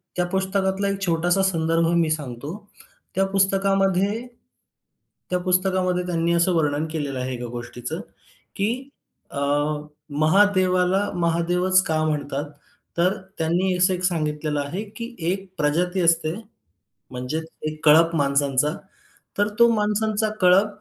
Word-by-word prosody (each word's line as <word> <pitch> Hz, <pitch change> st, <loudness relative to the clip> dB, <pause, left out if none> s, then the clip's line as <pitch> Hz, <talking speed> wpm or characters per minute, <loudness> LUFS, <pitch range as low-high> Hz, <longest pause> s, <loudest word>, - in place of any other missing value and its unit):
त्या 180 Hz, -, +1 dB
पुस्तकातला 190 Hz, +1 st, 0 dB
एक 200 Hz, 0 st, -2 dB
छोटासा 175 Hz, +3 st, +2 dB
संदर्भ 165 Hz, -2 st, +1 dB
मी 165 Hz, -2 st, +2 dB
सांगतो. 145 Hz, 0 st, -4 dB, 0.6 s
त्या 195 Hz, -, +3 dB
पुस्तकामध्ये 195 Hz, +2 st, +1 dB, 1.0 s
त्या 180 Hz, 0 st, 0 dB
पुस्तकामध्ये 185 Hz, 0 st, +1 dB
त्यांनी 170 Hz, -1 st, 0 dB
असं 170 Hz, +2 st, +3 dB
वर्णन 150 Hz, -2 st, +1 dB
केलेलं 145 Hz, -4 st, -3 dB
आहे 130 Hz, 0 st, -3 dB
एका 120 Hz, 0 st, -5 dB
गोष्टीचं, 120 Hz, 0 st, -6 dB, 0.6 s
की 245 Hz, +7 st, -2 dB, 0.4 s
अ, -, -, -11 dB, 0.7 s
महादेवाला 185 Hz, +4 st, +3 dB
महादेवच 175 Hz, +3 st, +2 dB
का 155 Hz, -1 st, 0 dB
म्हणतात? 145 Hz, -1 st, -2 dB, 0.5 s
तर 180 Hz, +4 st, +2 dB, 0.2 s
त्यांनी 180 Hz, +3 st, +1 dB
असं 180 Hz, +1 st, +3 dB
एक 180 Hz, -, -5 dB
सांगितलेलं 150 Hz, -3 st, -1 dB
आहे, 145 Hz, +8 st, -4 dB
की 230 Hz, +3 st, -8 dB, 0.2 s
एक 190 Hz, 0 st, -3 dB
प्रजाती 175 Hz, +5 st, +1 dB
असते, 165 Hz, -1 st, +2 dB, 0.8 s
म्हणजे 125 Hz, +5 st, -3 dB, 0.3 s
एक 155 Hz, 0 st, -9 dB
कळप 165 Hz, +2 st, +6 dB
माणसांचा. 140 Hz, -1 st, +2 dB, 0.7 s
तर 205 Hz, -, +3 dB
तो 235 Hz, -, +7 dB
माणसांचा 215 Hz, +1 st, 0 dB
कळप 185 Hz, +3 st, +5 dB
180 Hz, 120 wpm, -23 LUFS, 155-190 Hz, 1.0 s, तो